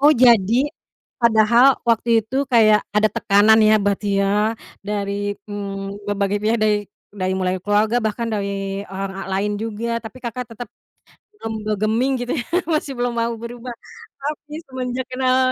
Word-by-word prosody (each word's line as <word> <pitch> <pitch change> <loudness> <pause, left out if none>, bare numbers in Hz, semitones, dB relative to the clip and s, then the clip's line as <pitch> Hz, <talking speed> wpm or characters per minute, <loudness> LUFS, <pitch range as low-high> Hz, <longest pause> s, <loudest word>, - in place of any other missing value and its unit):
Oh, 295 +2 +7
jadi, 230 -6 +5 0.7
padahal 235 +1 +5 0.2
waktu 230 0 +2 0.2
itu, 245 +5 -5 0.2
kayak 215 -2 +6 0.2
ada 215 +1 +4
tekanan 210 +2 +5
ya, 215 - +6
berarti 205 0 0
ya, 205 +2 +2 0.3
dari, 200 -1 -2 0.4
mmm, 200 0 -6
berbagai 205 0 0
pihak, 225 +2 +1
dari 215 -1 +3 0.4
dari 185 -2 -1
mulai 185 0 0
keluarga, 210 +3 +2
bahkan 220 +2 -2
dari 200 -1 -3
orang 195 0 -4
al - - -9
lain 205 +1 -1
juga, 230 +1 -3
tapi 225 +3 -9
Kakak 240 0 -5
tetep, 235 +2 -8 0.7
mmm, 220 -1 -4
bergeming 215 +5 +1
gitu, 245 +1 -2
ya, - - -9 0.2
masih 305 -4 -1
belum 245 0 -1
mau 230 0 0
berubah. 240 +1 -7 0.5
Tapi, 295 +1 -6
semenjak 255 -1 -4
kenal, 255 0 +2
220 Hz, 150 wpm, -21 LUFS, 205-240 Hz, 0.7 s, Oh